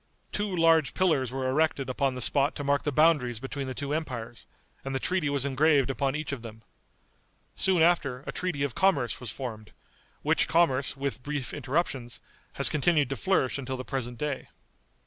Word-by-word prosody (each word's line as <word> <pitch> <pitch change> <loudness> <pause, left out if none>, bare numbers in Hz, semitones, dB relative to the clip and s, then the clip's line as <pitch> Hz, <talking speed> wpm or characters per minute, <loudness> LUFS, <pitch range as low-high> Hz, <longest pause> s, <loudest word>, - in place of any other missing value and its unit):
Two 205 -3 -2
large 165 -3 +4
pillars 150 -9 +2
were 130 0 -2
erected 140 0 +1
upon 130 0 0
the 125 - 0
spot 140 +4 +2
to 145 - -4
mark 140 0 +2
the 145 - +1
boundaries 145 -6 +3
between 135 +2 -5
the 130 - -5
two 140 0 -3
empires, 125 -7 -5 0.4
and 135 0 -4
the - - 0
treaty 180 -3 0
was 140 -1 0
engraved 140 0 +3
upon 135 0 -1
each 155 -1 -3
of 140 -4 -4
them. 110 -1 -10 0.9
Soon 185 -4 +3
after, 140 -7 +2
a - - -4
treaty 180 -6 -2
of 140 -4 -1
commerce 145 -10 +1
was 125 - -6
formed, 110 -3 -7 0.5
which - - +2
commerce, 140 -5 +2
with 135 -3 -3
brief 145 -2 -4
interruptions, 130 -5 -2 0.3
has - - +2
continued 150 -2 +2
to 135 - -2
flourish 145 -6 +1
until 130 -1 -4
the 130 - -6
present 125 -3 -4
day. 145 +1 -3
140 Hz, 185 wpm, -28 LUFS, 130-155 Hz, 0.9 s, large